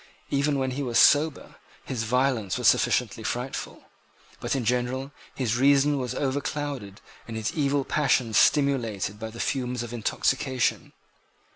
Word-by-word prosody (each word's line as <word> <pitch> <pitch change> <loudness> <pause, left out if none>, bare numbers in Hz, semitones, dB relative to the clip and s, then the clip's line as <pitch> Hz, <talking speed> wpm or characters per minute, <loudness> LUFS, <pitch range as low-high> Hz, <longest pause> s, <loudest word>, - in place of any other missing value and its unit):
Even 140 +1 +1
when 130 -1 -1
he 135 +3 -4
was 120 -4 -1
sober, 150 +1 +3 0.3
his 115 -4 -3
violence 125 -4 0
was - - +1
sufficiently 115 -2 +2
frightful. 120 +4 -4 0.6
But - - -2
in 130 -4 -2
general 125 +3 -1 0.2
his 120 -3 -1
reason 140 +2 +4
was 125 -2 -3
overclouded 140 -6 -3 0.3
and 115 -1 -5
his 110 +6 -2
evil 140 -4 0
passions 125 -6 +1
stimulated 110 -3 +2
by 110 0 -5
the 115 +1 -11
fumes 125 -2 -2
of 120 0 -8
intoxication. 130 +3 -1
130 Hz, 140 wpm, -26 LUFS, 115-140 Hz, 0.6 s, reason